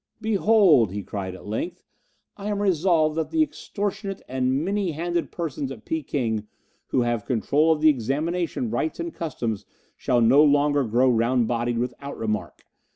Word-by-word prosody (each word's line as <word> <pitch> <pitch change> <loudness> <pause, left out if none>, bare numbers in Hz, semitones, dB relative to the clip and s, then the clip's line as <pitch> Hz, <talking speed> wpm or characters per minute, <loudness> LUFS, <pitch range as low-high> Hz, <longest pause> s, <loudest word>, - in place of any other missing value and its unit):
"Behold," 205 - +4
he 100 +1 -4
cried 95 -1 -5
at - - -13
length, 110 +12 -4 0.5
"I 200 0 -7
am 205 -1 -1
resolved 170 -5 +2
that 160 - -1
the 320 -1 +3
extortionate 200 -7 -4
and 130 +3 0
many 195 -3 -1
handed 170 +2 -2
persons 150 -5 -4
at 115 -5 -10
Peking 120 -9 -2 0.4
who 130 - +1
have 120 -3 0
control 145 +6 +2
of 155 -1 +1
the 155 - +7
examination 145 +1 -1
rites 155 +8 -2
and 170 0 -4
customs 120 -10 -3 0.3
shall 125 - +1
no 125 +6 +6
longer 145 -1 +3
grow 120 +4 +2
round 120 0 +2
bodied 120 0 -1
without 125 +4 -4
remark. 105 -1 -3
145 Hz, 160 wpm, -24 LUFS, 120-170 Hz, 0.5 s, the